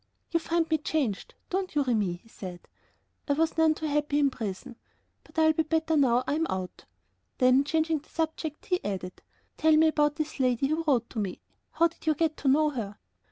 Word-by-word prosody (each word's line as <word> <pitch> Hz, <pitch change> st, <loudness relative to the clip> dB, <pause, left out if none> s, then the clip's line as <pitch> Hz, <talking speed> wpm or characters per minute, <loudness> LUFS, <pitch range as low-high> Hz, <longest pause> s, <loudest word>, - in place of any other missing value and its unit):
"You 335 Hz, -, +2 dB
find 330 Hz, 0 st, 0 dB
me 315 Hz, -1 st, +1 dB
changed, 280 Hz, -9 st, -2 dB, 0.2 s
don't 370 Hz, -2 st, -2 dB
you, 290 Hz, -, +3 dB
Remi?" 215 Hz, -8 st, +1 dB
he 175 Hz, +6 st, -13 dB
said; 185 Hz, -5 st, -9 dB, 0.6 s
"I 285 Hz, -, +2 dB
was 320 Hz, +2 st, +1 dB
none 320 Hz, -1 st, +4 dB
too 315 Hz, -, -5 dB
happy 295 Hz, -1 st, 0 dB
in 285 Hz, -2 st, +3 dB
prison, 225 Hz, +2 st, -6 dB, 0.5 s
but -, -, -21 dB
I'll 315 Hz, 0 st, +5 dB
be 320 Hz, -, +1 dB
better 320 Hz, 0 st, 0 dB
now 255 Hz, -4 st, +3 dB
I'm 315 Hz, +4 st, 0 dB
out." 185 Hz, -1 st, -5 dB, 0.5 s
Then, 255 Hz, +1 st, +5 dB
changing 315 Hz, +1 st, 0 dB
the 290 Hz, -, -24 dB
subject, 315 Hz, -1 st, -3 dB
he 360 Hz, -1 st, -1 dB
added: 185 Hz, -2 st, -5 dB, 0.4 s
"Tell 315 Hz, -1 st, +4 dB
me 320 Hz, 0 st, +5 dB
about 295 Hz, -1 st, +2 dB
this 310 Hz, -2 st, -4 dB
lady 255 Hz, +1 st, +2 dB
who 315 Hz, +2 st, 0 dB
wrote 245 Hz, -5 st, +2 dB
to 225 Hz, -, -4 dB
me; 195 Hz, -4 st, -3 dB, 0.3 s
how 335 Hz, -, +4 dB
did 330 Hz, -, -18 dB
you 310 Hz, -, +4 dB
get 315 Hz, 0 st, 0 dB
to 280 Hz, -, -4 dB
know 300 Hz, +3 st, +4 dB
her?" 215 Hz, -6 st, -5 dB
295 Hz, 205 wpm, -28 LUFS, 245-320 Hz, 0.6 s, I'll